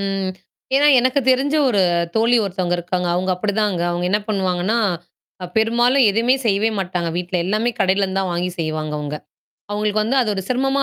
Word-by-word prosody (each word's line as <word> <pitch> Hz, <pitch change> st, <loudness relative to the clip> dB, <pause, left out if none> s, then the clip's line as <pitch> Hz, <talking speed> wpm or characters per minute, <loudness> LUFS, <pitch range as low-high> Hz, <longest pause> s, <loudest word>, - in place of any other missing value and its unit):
ம். 195 Hz, -1 st, -2 dB, 0.4 s
ஏன்னா, 285 Hz, +2 st, +4 dB
எனக்குத் 255 Hz, +2 st, +1 dB
தெரிஞ்ச 270 Hz, +3 st, +1 dB
ஒரு 210 Hz, -5 st, +2 dB, 0.3 s
தோழி 230 Hz, +2 st, +3 dB
ஒருத்தவுங்க 180 Hz, -2 st, -1 dB
இருக்காங்க, 180 Hz, +1 st, -2 dB
அவுங்க 185 Hz, +1 st, -1 dB
அப்பிடித்தாங்க. 205 Hz, -1 st, -1 dB
அவுங்க 175 Hz, +1 st, -2 dB
என்ன 210 Hz, +1 st, +2 dB
பண்ணுவாங்கன்னா, 190 Hz, +1 st, 0 dB, 0.7 s
அ, -, -, -4 dB
பெரும்பாலும் 240 Hz, +4 st, +3 dB
எதுமே 230 Hz, +5 st, +2 dB
செய்யவே 220 Hz, +1 st, +2 dB
மாட்டாங்க, 180 Hz, -2 st, -2 dB
வீட்ல. 180 Hz, +1 st, -2 dB
எல்லாமே 215 Hz, +6 st, 0 dB
கடையில 195 Hz, +1 st, +2 dB
இருந்துதான் 190 Hz, -1 st, -2 dB
வாங்கி 175 Hz, +1 st, -2 dB
செய்வாங்க 155 Hz, -1 st, -3 dB
அவுங்க. 150 Hz, 0 st, -4 dB, 0.5 s
அவுங்களுக்கு 210 Hz, 0 st, 0 dB
வந்து, 235 Hz, +6 st, 0 dB
அது 225 Hz, -, 0 dB
ஒரு 190 Hz, -, -3 dB
சிரமமா 270 Hz, +2 st, +1 dB
200 Hz, 165 wpm, -20 LUFS, 180-230 Hz, 0.7 s, ஏன்னா